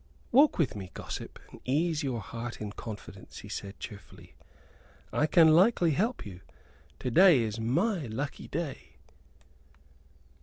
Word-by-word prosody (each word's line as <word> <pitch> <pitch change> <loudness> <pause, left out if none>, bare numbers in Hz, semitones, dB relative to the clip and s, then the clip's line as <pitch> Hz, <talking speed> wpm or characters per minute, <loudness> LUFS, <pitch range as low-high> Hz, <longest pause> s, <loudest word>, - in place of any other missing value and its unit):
"Walk 285 +5 +5
with 150 -10 +1
me, 95 -3 -7
gossip, - - -7
and - - -13
ease 155 +4 0
your 130 -6 -2
heart 115 +2 -7
in 105 -1 -5
confidence," 110 -1 -9
he - - -10
said, 100 0 -6
cheerfully. 100 -4 -11 0.8
"I 150 - +2
can 160 +1 +6
likely 175 +1 +5
help 220 - -1
you. 95 -3 -9 0.6
To 125 - -2
day 175 -2 +7
is 110 0 -3
my 160 - 0
lucky 135 +6 -5
day." 160 -2 -5
140 Hz, 140 wpm, -29 LUFS, 110-170 Hz, 0.8 s, day